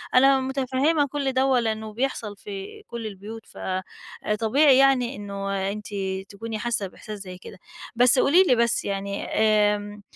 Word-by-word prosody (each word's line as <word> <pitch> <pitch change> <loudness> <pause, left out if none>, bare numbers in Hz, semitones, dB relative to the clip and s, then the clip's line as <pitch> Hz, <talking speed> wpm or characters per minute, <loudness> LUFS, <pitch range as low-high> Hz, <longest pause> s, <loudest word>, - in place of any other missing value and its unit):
أنا 270 +1 +6
مُتفهّمة 270 +3 +1
كل 275 -1 -2
دوّه 260 +1 +2
ولإنه 220 -3 0
بيحصل 230 -4 -3
في 195 -1 -8
كل 230 -2 -5
البيوت، 215 +3 -9
فآآ، 185 0 -4 0.6
طبيعي 265 +4 +5
يعني 270 -2 +3
إنه 195 -1 -3
أنتِ 210 0 -7 0.4
تكوني 220 +1 -6
حاسّة 225 -4 -1
بإحساس 210 +2 -9
زي 185 -2 -8
كده. 185 - -12 0.4
بس 250 +2 +5
قولي 345 +7 +5
لي، 255 -9 +3
بس 235 0 +1
يعني، 200 0 -3
آمم، 210 -1 +1
225 Hz, 150 wpm, -24 LUFS, 205-260 Hz, 0.6 s, أنا